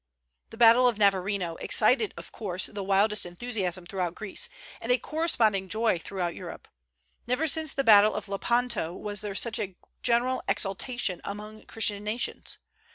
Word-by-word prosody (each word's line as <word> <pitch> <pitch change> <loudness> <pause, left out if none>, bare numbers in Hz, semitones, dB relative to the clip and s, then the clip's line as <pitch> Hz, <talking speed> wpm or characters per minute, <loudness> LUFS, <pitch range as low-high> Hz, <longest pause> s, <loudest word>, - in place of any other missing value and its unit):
The 225 - -12
battle 240 +2 +6
of 235 -4 0
Navarino 195 -3 +1
excited, 435 - +3
of - - -7
course, 185 -4 -3
the 200 -1 -5
wildest 200 +2 +2
enthusiasm 185 -1 -2
throughout 180 -1 -3
Greece, 215 -3 -4 0.3
and 235 - -1
a 250 - +5
corresponding 225 - 0
joy 220 -4 +1
throughout 175 -1 -3
Europe. - - -9 0.6
Never 250 +6 0
since 315 -1 -1
the 275 - +1
battle 215 -2 +6
of 210 - -4
Lepanto 210 -3 -1
was 205 +1 -4
there 205 -2 -4
such 230 +2 +1
a 195 -4 -4 0.3
general 245 +2 +1
exultation 195 -1 0
among 210 +2 -8
Christian 210 -2 -2
nations. 215 +3 -3
210 Hz, 155 wpm, -27 LUFS, 195-240 Hz, 0.6 s, battle